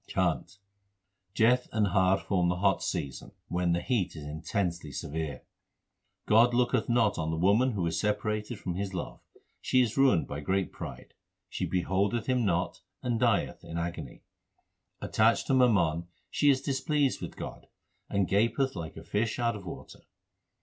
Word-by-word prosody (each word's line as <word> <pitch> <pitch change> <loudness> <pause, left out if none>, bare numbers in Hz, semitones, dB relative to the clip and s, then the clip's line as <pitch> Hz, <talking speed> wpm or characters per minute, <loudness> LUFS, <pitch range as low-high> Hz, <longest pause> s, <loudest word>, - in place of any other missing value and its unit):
CHHANT - - -1 0.8
Jeth 120 +4 +3
and 110 -1 +2
Har 95 +1 +3
form 90 -3 0
the 90 - +1
hot 95 +1 +2
season 70 -2 -4 0.2
when 90 0 +1
the 85 - 0
heat 100 -10 0
is 75 - -7
in 75 +2 -6
tensely 85 -4 -2
severe. 75 0 -4 0.8
God 120 +3 +5
looketh 125 0 +1
not 115 -5 +2
on 80 0 -1
the 80 - -1
woman 105 +9 +3
who 95 -5 -1
is 85 - -1
separated 105 +2 -1
from 90 -2 -4
His 95 +1 -4
love. 85 - -5 0.4
She 130 - +2
is 115 0 -3
ruined 135 -11 +4
by 70 - -5
great 95 +5 -1
pride; - - -9 0.4
she - - -3
beholdeth 95 +5 0
Him 125 -2 +1
not, 90 -3 0 0.2
and 120 -2 0
dieth 120 -5 +1
in 85 - -6
agony. 85 -5 -5 0.8
Attached 110 +1 +2
to - - 0
mammon 85 -10 +3 0.2
she 145 - +3
is 130 -2 +3
displeased 140 0 0
with - - -7
God, - - -8 0.4
and 100 -2 +1
gaspeth 115 +6 +1
like 80 -3 -6
a 80 - -8
fish 105 +6 -1
out 120 -2 0
of 100 -3 -9
water. - - -9
100 Hz, 165 wpm, -29 LUFS, 85-120 Hz, 0.8 s, God